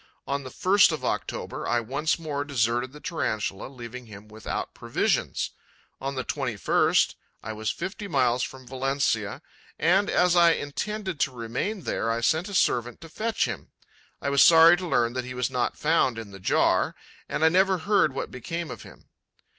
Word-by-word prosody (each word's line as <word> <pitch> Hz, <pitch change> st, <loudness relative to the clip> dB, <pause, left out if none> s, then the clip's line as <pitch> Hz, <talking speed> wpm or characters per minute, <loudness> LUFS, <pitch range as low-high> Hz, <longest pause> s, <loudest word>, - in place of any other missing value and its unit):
On 140 Hz, 0 st, -2 dB
the 130 Hz, -, -8 dB
1st 190 Hz, +7 st, +4 dB
of 155 Hz, -, -4 dB
October, -, -, -3 dB
I 120 Hz, -, +2 dB
once 140 Hz, +7 st, -1 dB
more 150 Hz, -4 st, -3 dB
deserted 120 Hz, -2 st, 0 dB
the 150 Hz, -, -12 dB
Tarantula, 110 Hz, -, -3 dB
leaving 125 Hz, -2 st, -9 dB
him 105 Hz, -1 st, -12 dB
without 110 Hz, +1 st, -5 dB
provisions. -, -, -1 dB, 0.5 s
On 135 Hz, +1 st, -3 dB
the 130 Hz, -, -2 dB
21st, 125 Hz, -8 st, +1 dB, 0.3 s
I 110 Hz, -, -5 dB
was 110 Hz, 0 st, -3 dB
fifty 200 Hz, +2 st, -4 dB
miles 130 Hz, -6 st, +2 dB
from 130 Hz, +1 st, -6 dB
Valencia 135 Hz, -2 st, -1 dB, 0.3 s
and, 190 Hz, +5 st, +3 dB
as 180 Hz, 0 st, +3 dB
I 170 Hz, -1 st, +6 dB
intended 190 Hz, +4 st, -4 dB
to 140 Hz, -, +1 dB
remain 125 Hz, -, -3 dB
there, 115 Hz, -, -2 dB
I 115 Hz, +1 st, 0 dB
sent 160 Hz, -, +1 dB
a 200 Hz, -, -5 dB
servant 120 Hz, -7 st, +1 dB
to 165 Hz, -, -10 dB
fetch 220 Hz, +7 st, -1 dB
him. -, -, -6 dB, 0.5 s
I 140 Hz, -, 0 dB
was 140 Hz, -, +4 dB
sorry 165 Hz, +1 st, +8 dB
to 180 Hz, 0 st, -5 dB
learn 120 Hz, -7 st, +1 dB
that 130 Hz, 0 st, -2 dB
he 125 Hz, 0 st, -7 dB
was 125 Hz, +1 st, -1 dB
not 125 Hz, -2 st, -1 dB
found 150 Hz, -6 st, +2 dB
in 110 Hz, -3 st, -7 dB
the 95 Hz, -, -10 dB
jar, 95 Hz, -, +2 dB, 0.3 s
and 160 Hz, -, +1 dB
I -, -, +7 dB
never 190 Hz, +2 st, +3 dB
heard 200 Hz, -3 st, +2 dB
what -, -, -4 dB
became 165 Hz, +7 st, -5 dB
of -, -, -8 dB
him. -, -, -15 dB
140 Hz, 180 wpm, -26 LUFS, 120-170 Hz, 0.5 s, sorry